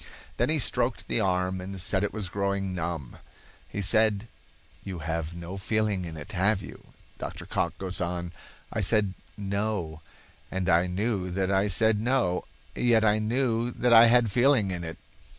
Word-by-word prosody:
Then 120 Hz, -, +1 dB
he 155 Hz, -, +3 dB
stroked 125 Hz, -2 st, 0 dB
the -, -, +1 dB
arm 90 Hz, -2 st, 0 dB
and 95 Hz, +1 st, -6 dB
said 95 Hz, +1 st, +2 dB
it 105 Hz, -, -1 dB
was 105 Hz, -4 st, -4 dB
growing 100 Hz, 0 st, -1 dB
numb. 85 Hz, -6 st, -4 dB, 0.5 s
He 100 Hz, -, -4 dB
said: 110 Hz, +1 st, +3 dB, 0.6 s
"You 95 Hz, -2 st, -5 dB
have 80 Hz, 0 st, -3 dB
no 85 Hz, +3 st, -7 dB
feeling 105 Hz, -2 st, 0 dB
in 80 Hz, -2 st, -7 dB
it, 75 Hz, -, -7 dB
have 95 Hz, +2 st, +1 dB
you?" -, -, -11 dB, 0.3 s
Dr. -, -, -6 dB
Cocke -, -, -1 dB
goes 95 Hz, -1 st, -3 dB
on: 85 Hz, 0 st, -3 dB, 0.4 s
"I 110 Hz, -, -1 dB
said 105 Hz, -1 st, +2 dB, 0.2 s
'No,' 100 Hz, -5 st, -2 dB, 0.5 s
and 95 Hz, -1 st, -2 dB
I 85 Hz, +1 st, +4 dB
knew 95 Hz, 0 st, -1 dB
that 95 Hz, +1 st, -1 dB
I 95 Hz, +1 st, +2 dB
said 110 Hz, +1 st, +2 dB
'No,' 115 Hz, -7 st, +1 dB, 0.3 s
yet 115 Hz, -2 st, +3 dB
I 105 Hz, 0 st, +3 dB
knew 115 Hz, +1 st, 0 dB
that 125 Hz, -1 st, +2 dB
I 115 Hz, +1 st, +9 dB
had 120 Hz, 0 st, +5 dB
a -, -, -2 dB
feeling 120 Hz, -2 st, +3 dB
in 90 Hz, -2 st, -3 dB
it." 80 Hz, -1 st, -6 dB
100 Hz, 175 wpm, -27 LUFS, 90-110 Hz, 0.6 s, I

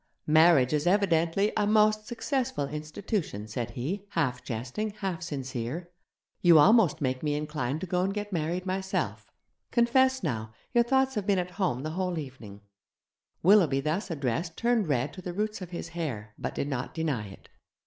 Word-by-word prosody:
'Marriage 155 Hz, -4 st, +5 dB
is 150 Hz, +2 st, +1 dB
evidently 185 Hz, 0 st, +2 dB
a 210 Hz, -1 st, +1 dB
most 215 Hz, 0 st, +3 dB
successful 240 Hz, -, -2 dB
institution,' 155 Hz, -, -4 dB
said 115 Hz, +2 st, -4 dB
he, 190 Hz, +11 st, -3 dB
half 125 Hz, -6 st, 0 dB
jesting, 125 Hz, -, -3 dB
half 185 Hz, -4 st, -2 dB
sincere; 140 Hz, +1 st, -4 dB, 0.5 s
'you 170 Hz, -2 st, +7 dB
almost 195 Hz, +1 st, +5 dB
make 130 Hz, -2 st, -1 dB
me 150 Hz, -1 st, 0 dB
inclined 150 Hz, -2 st, -2 dB
to -, -, -2 dB
go 180 Hz, 0 st, 0 dB
and 190 Hz, +2 st, +1 dB
get 205 Hz, 0 st, -4 dB
married 170 Hz, +3 st, -1 dB
myself. 190 Hz, 0 st, -2 dB, 0.4 s
Confess 260 Hz, +2 st, +3 dB
now 110 Hz, -7 st, -3 dB, 0.2 s
your 240 Hz, -1 st, +5 dB
thoughts 265 Hz, +2 st, +2 dB
have 210 Hz, -4 st, -3 dB
been 200 Hz, -2 st, +3 dB
at 180 Hz, 0 st, -2 dB
home 175 Hz, -, -1 dB
the 155 Hz, -, -3 dB
whole 180 Hz, 0 st, -2 dB
evening.' 125 Hz, -9 st, -8 dB, 0.8 s
Willoughby 170 Hz, -7 st, +5 dB
thus 160 Hz, +9 st, -2 dB
addressed 160 Hz, +2 st, -2 dB
turned 235 Hz, -4 st, +2 dB
red 145 Hz, 0 st, 0 dB
to 185 Hz, -, -9 dB
the 180 Hz, -1 st, -5 dB
roots 210 Hz, +2 st, -2 dB
of 180 Hz, -, -6 dB
his 170 Hz, -2 st, -6 dB
hair, 130 Hz, -11 st, -5 dB
but -, -, -5 dB
did 140 Hz, -, -2 dB
not 135 Hz, -4 st, -4 dB
deny 145 Hz, -10 st, -1 dB
it. 95 Hz, -, -14 dB
165 Hz, 170 wpm, -28 LUFS, 140-200 Hz, 0.8 s, you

